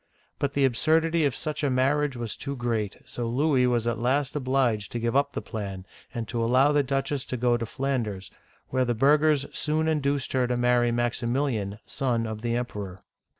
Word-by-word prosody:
But 140 Hz, 0 st, -1 dB
the 140 Hz, -1 st, +4 dB
absurdity 160 Hz, +6 st, +2 dB
of 140 Hz, -, 0 dB
such 155 Hz, -1 st, -3 dB
a 145 Hz, -, +2 dB
marriage 135 Hz, +1 st, +1 dB
was 115 Hz, -2 st, -4 dB
too 140 Hz, -1 st, -5 dB
great, 115 Hz, -5 st, -2 dB
so 120 Hz, -1 st, -4 dB
Louis 130 Hz, 0 st, +3 dB
was 120 Hz, -2 st, +1 dB
at 120 Hz, -1 st, -1 dB
last 130 Hz, +4 st, 0 dB
obliged 130 Hz, -6 st, 0 dB
to 120 Hz, -, -1 dB
give 115 Hz, +2 st, -1 dB
up 140 Hz, 0 st, +2 dB
the -, -, -4 dB
plan, 100 Hz, -4 st, -5 dB, 0.3 s
and 115 Hz, -4 st, -4 dB
to 120 Hz, -2 st, -1 dB
al 115 Hz, -, +1 dB
low 130 Hz, +4 st, +4 dB
the 145 Hz, -, +4 dB
duchess 135 Hz, 0 st, -1 dB
to 125 Hz, -, -4 dB
go 120 Hz, 0 st, +2 dB
to 115 Hz, -1 st, -3 dB
Flanders, 120 Hz, -7 st, -2 dB, 0.4 s
where 130 Hz, 0 st, +1 dB
the 120 Hz, -1 st, 0 dB
burghers 145 Hz, +3 st, +4 dB
soon 155 Hz, +1 st, 0 dB
induced 140 Hz, -3 st, 0 dB
her 130 Hz, -2 st, +2 dB
to 125 Hz, 0 st, 0 dB
marry 120 Hz, 0 st, +3 dB
Maximil'ian, 120 Hz, -3 st, -1 dB
son 120 Hz, -4 st, -1 dB
of 110 Hz, -1 st, -5 dB
the 120 Hz, 0 st, -1 dB
Emperor. 100 Hz, -6 st, -4 dB
125 Hz, 195 wpm, -26 LUFS, 115-140 Hz, 0.4 s, the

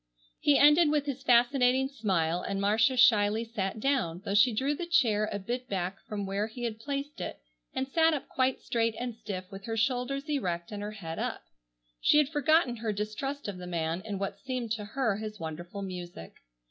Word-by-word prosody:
He 285 Hz, -1 st, +4 dB
ended 300 Hz, +2 st, +6 dB
with 295 Hz, -1 st, +1 dB
his 275 Hz, -2 st, -4 dB
fascinating 250 Hz, +2 st, +4 dB
smile, 180 Hz, -, 0 dB
and 195 Hz, +1 st, -3 dB
Marcia 220 Hz, +5 st, +3 dB
shyly 215 Hz, -2 st, +5 dB
sat 215 Hz, -2 st, -3 dB
down, 215 Hz, -10 st, 0 dB
though 200 Hz, -, -1 dB
she 225 Hz, +5 st, +6 dB
drew 265 Hz, +6 st, 0 dB
the 340 Hz, +4 st, -5 dB
chair 220 Hz, -11 st, +3 dB
a -, -, -2 dB
bit 245 Hz, +6 st, -4 dB
back 190 Hz, 0 st, -2 dB
from 205 Hz, -2 st, -3 dB
where 200 Hz, +2 st, -1 dB
he 240 Hz, +2 st, -8 dB
had 225 Hz, -2 st, -3 dB
placed 280 Hz, +3 st, -4 dB
it -, -, -5 dB, 0.4 s
and 265 Hz, -, -1 dB
sat 325 Hz, +4 st, +4 dB
up 295 Hz, -3 st, -3 dB
quite 260 Hz, 0 st, 0 dB
straight 230 Hz, -1 st, 0 dB
and 245 Hz, 0 st, -3 dB
stiff 195 Hz, -4 st, -7 dB
with 195 Hz, 0 st, -9 dB
her 225 Hz, -1 st, -3 dB
shoulders 260 Hz, +4 st, 0 dB
erect 180 Hz, -, -2 dB
and 205 Hz, -1 st, -5 dB
her 210 Hz, +1 st, -5 dB
head 165 Hz, -6 st, -6 dB
up. -, -, -3 dB, 0.6 s
She -, -, +4 dB
had 300 Hz, -2 st, +4 dB
forgotten 295 Hz, -4 st, +2 dB
her 225 Hz, -1 st, -2 dB
distrust 215 Hz, +8 st, -4 dB
of 195 Hz, -3 st, -5 dB
the 180 Hz, -, -7 dB
man 165 Hz, 0 st, -2 dB
in 210 Hz, -2 st, -4 dB
what 195 Hz, 0 st, -4 dB
seemed 255 Hz, -4 st, -4 dB
to 215 Hz, -2 st, -2 dB
her 225 Hz, -2 st, 0 dB
his 215 Hz, -1 st, -6 dB
wonderful 175 Hz, +5 st, -6 dB
music. 175 Hz, -, -7 dB
225 Hz, 200 wpm, -29 LUFS, 195-265 Hz, 0.6 s, ended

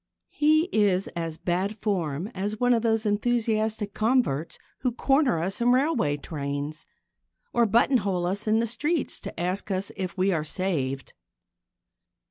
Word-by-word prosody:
He 310 Hz, +1 st, +4 dB
is 195 Hz, -3 st, +2 dB
as 165 Hz, -2 st, -4 dB
bad 190 Hz, +5 st, -1 dB
form 175 Hz, -7 st, -1 dB
as 205 Hz, +3 st, -3 dB
one 245 Hz, 0 st, +4 dB
of 230 Hz, -, +2 dB
those 225 Hz, -1 st, +1 dB
enthusiastic 215 Hz, -1 st, 0 dB
converts 215 Hz, -, +1 dB, 0.2 s
who 250 Hz, -2 st, 0 dB
corner 270 Hz, -, +2 dB
us 190 Hz, +7 st, -2 dB
in 240 Hz, +1 st, +4 dB
railway 250 Hz, -, +2 dB
trains 145 Hz, 0 st, -5 dB, 0.7 s
or 235 Hz, -1 st, +4 dB
buttonhole 200 Hz, -5 st, +2 dB
us 195 Hz, +4 st, -2 dB
in 220 Hz, +1 st, +3 dB
the 230 Hz, -, +1 dB
streets 295 Hz, +7 st, -1 dB
to -, -, -8 dB
ask 180 Hz, +4 st, -2 dB
us 190 Hz, 0 st, -2 dB
if 190 Hz, -1 st, -4 dB
we 190 Hz, +2 st, +2 dB
are 160 Hz, -4 st, 0 dB
saved. 145 Hz, -5 st, -2 dB
200 Hz, 145 wpm, -26 LUFS, 175-235 Hz, 0.7 s, He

